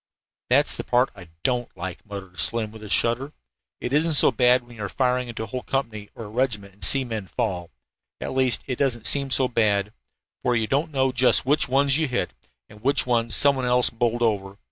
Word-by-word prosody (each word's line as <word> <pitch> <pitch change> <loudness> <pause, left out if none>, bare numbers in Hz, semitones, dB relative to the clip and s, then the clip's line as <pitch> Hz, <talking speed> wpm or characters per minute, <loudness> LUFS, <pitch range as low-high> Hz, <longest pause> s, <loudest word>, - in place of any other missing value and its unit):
"That's - - +3
the - - -5
part 125 +1 +1
of - - -27
it 85 - -13
I - - -26
don't 125 -5 -2
like," 90 0 -7
muttered 95 -4 -9
Slim 115 -2 +1
with 110 0 -13
a 105 - -10
shudder. 125 +8 +1 0.5
"It 125 - -5
isn't 155 +2 +2
so 140 - +8
bad 125 +1 +3
when 120 0 -15
you 110 - -7
are 100 - -4
firing 125 +1 0
into 115 -2 -6
a - - -4
whole 125 +4 -6
company 110 -7 -4
or 115 - -8
regiment 105 -5 -2
and 100 0 -7
see 135 +8 +6
men 110 -5 -5
fall. 90 -5 -3 0.5
At - - -5
least, 130 -2 +1
it 125 -2 -4
doesn't 120 -5 -1
seem 140 -1 +2
so 130 0 +2
bad, 105 -3 0 0.5
for 125 - 0
you 115 -1 0
don't 140 +7 -1
know 135 -2 +1
just 125 0 +3
which 145 -1 +1
ones 140 +2 +2
you 160 - 0
hit 120 -8 -2 0.3
and 105 - -17
which 140 +4 +1
ones 115 -2 +2
some 140 -1 +5
one 130 -1 -3
else 125 0 +2
bowled 120 +1 -1
over. 100 -3 -1
120 Hz, 225 wpm, -23 LUFS, 105-130 Hz, 0.5 s, so